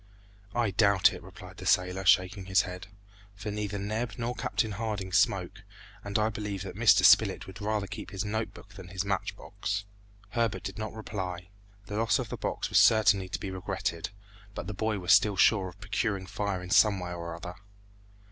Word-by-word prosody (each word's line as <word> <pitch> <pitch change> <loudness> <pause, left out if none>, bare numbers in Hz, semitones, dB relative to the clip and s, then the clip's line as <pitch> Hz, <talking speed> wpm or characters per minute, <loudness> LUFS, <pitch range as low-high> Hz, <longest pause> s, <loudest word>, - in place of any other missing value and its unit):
"I 120 -4 +1
doubt 100 0 +4
it," - - -8
replied - - -12
the - - -6
sailor, 90 +1 +2
shaking 95 +2 +3
his 95 +1 +3
head, 90 +1 -7 0.5
"for 105 +1 -5
neither 105 -1 -3
Neb 110 +3 -3
nor 120 +1 -2
Captain 115 -2 -1
Harding 100 -2 -3
smoke, - - +1 0.4
and 100 +1 -1
I 110 0 +2
believe 105 -3 -4
that 95 - -7
Mr. 110 -4 +5
Spilett 100 +1 +5
would 95 +3 -11
rather 105 -1 -1
keep - - -7
his 100 +1 -4
note 110 +2 -2
book 100 - -14
than 95 -3 -10
his 95 +2 -3
match 100 -1 -2
box." 100 0 -4 0.4
Herbert 115 -3 -1
did 95 +2 -6
not 110 0 -4
reply. 95 -5 -5 0.4
The 105 - -5
loss 115 +1 +2
of 125 -4 -4
the - - -4
box - - -2
was - - +6
certainly 100 -4 +5
to - - -3
be 100 - -5
regretted, 85 -3 -3 0.5
but - - -5
the 105 - -5
boy 110 +1 -1
was 90 -2 +3
still 105 -2 +4
sure 100 -1 +4
of 90 +2 -12
procuring 105 -2 -2
fire 100 -1 -3
in 90 - -8
some 100 -2 +5
way 90 -1 -5
or 85 -1 -5
other. 90 +1 -7
100 Hz, 195 wpm, -29 LUFS, 95-110 Hz, 0.5 s, was